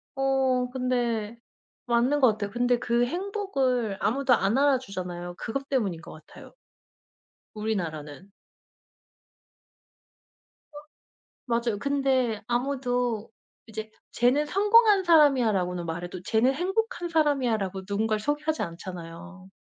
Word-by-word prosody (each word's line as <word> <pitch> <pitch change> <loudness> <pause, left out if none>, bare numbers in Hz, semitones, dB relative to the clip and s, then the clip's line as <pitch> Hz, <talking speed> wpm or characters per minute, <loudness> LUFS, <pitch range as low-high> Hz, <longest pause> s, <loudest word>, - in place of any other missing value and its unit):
어 265 -2 +1
근데 240 -4 -1 0.5
맞는 245 +4 +2
것 255 -5 +6
같아요. 205 -1 -5
근데 245 0 +1
그 240 0 +1
행복을 275 - -1
아무도 255 +5 +2
안 210 +1 +2
알아주잖아요. 185 -11 -1
그것 275 +4 -5
때문인 200 -11 -1
것 - - -11
같아요. - - -14 1.0
우리나라는. 180 -5 -4 2.4
어 295 - -10 0.7
맞아요. 235 -3 -1
근데 265 -4 0
아무도 245 -3 -1 0.4
이제 220 0 -7 0.2
"쟤는 255 +5 +2
성공한 415 +3 +4
사람이야."라고는 235 - +3
말해도 175 +2 -5
"쟤는 225 +6 +2
행복한 380 - -2
사람이야."라고 240 - 0
누군가를 215 +1 0
소개하지 295 +5 -1
않잖아요. 175 +2 -8
240 Hz, 270 characters per minute, -26 LUFS, 200-275 Hz, 2.4 s, 것